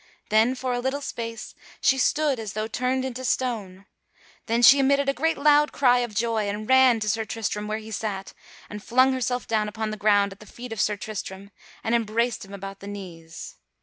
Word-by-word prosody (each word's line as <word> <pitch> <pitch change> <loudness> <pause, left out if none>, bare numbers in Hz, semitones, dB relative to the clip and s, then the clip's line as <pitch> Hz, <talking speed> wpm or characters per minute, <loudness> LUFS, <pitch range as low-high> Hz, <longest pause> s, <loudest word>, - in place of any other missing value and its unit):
Then, 225 +4 +3
for 255 -1 -3
a 245 - -1
little 265 +3 -2
space, 230 -5 -6 0.3
she 265 - +3
stood 290 -1 +1
as 215 -3 -6
though 215 +1 -2
turned 255 +3 -1
into 260 0 -5
stone; 215 -7 -2 0.6
then 235 +1 +1
she 275 +3 +9
emitted 280 +1 +2
a 275 - +2
great 320 +5 0
loud 295 +1 +4
cry 250 -3 +3
of 240 -4 -3
joy 220 -2 0
and 210 +1 -5
ran 260 -3 +5
to 215 - -2
Sir 225 +1 0
Tristram 215 -2 -4
where 215 0 -2
he 220 0 -10
sat, 200 -2 -4 0.3
and 210 0 -8
flung 255 +2 +3
herself 250 -1 -2
down 215 -2 0
upon 215 +1 -4
the 215 - -5
ground 205 -1 +3
at 195 - -12
the 210 - -14
feet 240 +1 -8
of 215 - -2
Sir 210 -1 0
Tristram 200 -1 -7 0.3
and 225 - -1
embraced 230 +1 0
him 195 - -13
about 195 0 -8
the 200 - -10
knees. 175 -5 -9
225 Hz, 210 wpm, -25 LUFS, 210-255 Hz, 0.6 s, she